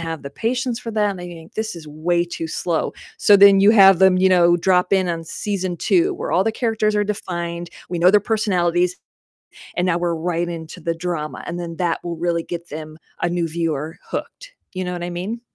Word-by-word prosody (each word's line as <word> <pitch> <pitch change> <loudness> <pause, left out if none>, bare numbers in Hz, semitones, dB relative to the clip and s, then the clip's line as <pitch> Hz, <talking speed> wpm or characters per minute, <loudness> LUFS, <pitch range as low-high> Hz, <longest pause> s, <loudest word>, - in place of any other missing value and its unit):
have 165 -2 -5
the 140 - -6
patience 245 - -2
for 230 - -6
that 215 -2 +1
and 195 - -6
they 175 - -7
think 165 -2 -12
this 220 -4 -3
is 160 -2 -10
way 170 +3 0
too 165 -1 -6
slow. 165 0 -1 0.2
So 205 - +6
then 200 0 +7
you 200 +2 +7
have 195 -4 +7
them, 190 -1 +5
you 190 +1 +4
know, 175 -2 +5
drop 180 +1 +2
in 190 -2 +3
on 165 -1 -2
season 185 +1 -3
2 365 - +2
where - - -4
all 185 - +4
the 225 - +2
characters 220 -2 0
are 205 - +2
defined, 175 -4 -4 0.2
we 175 - -3
know 180 +2 +6
their 210 +1 +5
personalities, 180 -5 +1 0.8
and 180 - 0
now 170 -1 +2
we're 170 -1 0
right 170 +1 -1
into 165 +1 -7
the 165 +1 -2
drama, 165 -3 -4
and 175 +1 -5
then 170 -1 -5
that 175 -2 0
will 170 -1 -4
really 170 0 -1
get 170 0 -7
them, 155 +1 -8 0.2
a - - +2
new 175 -1 -1
viewer, 160 -1 -3
hooked. - - -6 0.2
You 185 -1 -3
know 180 - -3
what 175 -1 -5
I 175 - -3
mean? 195 +7 -4
175 Hz, 225 wpm, -21 LUFS, 170-200 Hz, 0.8 s, then